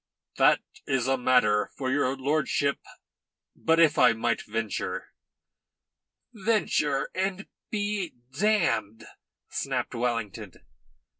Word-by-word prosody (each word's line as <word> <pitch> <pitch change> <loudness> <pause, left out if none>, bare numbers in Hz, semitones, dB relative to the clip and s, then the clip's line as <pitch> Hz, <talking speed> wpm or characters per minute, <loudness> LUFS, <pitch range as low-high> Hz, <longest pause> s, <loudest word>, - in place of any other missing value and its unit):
"That - - +5 0.3
is 130 -3 +1
a 135 - +3
matter 125 -5 +3
for 130 -1 -2
your 135 -1 +1
lordship. 140 0 0 0.8
But 165 0 +2
if 155 -2 +5
I 125 -2 +6
might 115 0 -1
venture 105 -3 -4 0.6
" - - -59
"Venture 200 - +1
and 190 +1 -2 0.2
be 205 - -2 0.2
damned," 170 - +1 0.5
snapped - - -2
Wellington. 115 -4 -3
135 Hz, 100 wpm, -27 LUFS, 115-180 Hz, 0.8 s, I